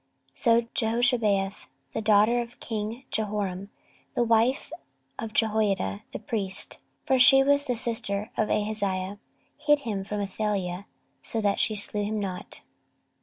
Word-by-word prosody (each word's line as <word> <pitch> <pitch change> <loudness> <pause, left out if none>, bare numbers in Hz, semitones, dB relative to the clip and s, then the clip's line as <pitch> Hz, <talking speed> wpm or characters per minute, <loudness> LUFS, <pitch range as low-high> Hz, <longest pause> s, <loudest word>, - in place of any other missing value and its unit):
So 235 -2 +3
Jehoshabeath, 225 -5 +1 0.3
the - - -2
daughter 215 +3 +4
of 240 0 -9
king 225 +3 -4
Jehoram, 200 -3 -2 0.5
the 240 - +3
wife 230 +5 +2 0.5
of 225 -1 -4
Jehoiada 210 - +1
the - - -4
priest, 195 -4 -4 0.3
(for 265 -1 +3
she 270 +2 +8
was 285 +1 +3
the 250 - 0
sister 220 -3 -2
of 215 - 0
Ahaziah,) 205 -2 -1 0.4
hid 295 -1 +3
him 210 -6 -3
from 210 +1 -4
Athaliah, 200 -2 -2 0.3
so 225 - -2
that 205 -1 +1
she 215 - +2
slew 205 0 0
him 215 +1 -2
not. 190 -2 -5
215 Hz, 135 wpm, -27 LUFS, 200-235 Hz, 0.5 s, she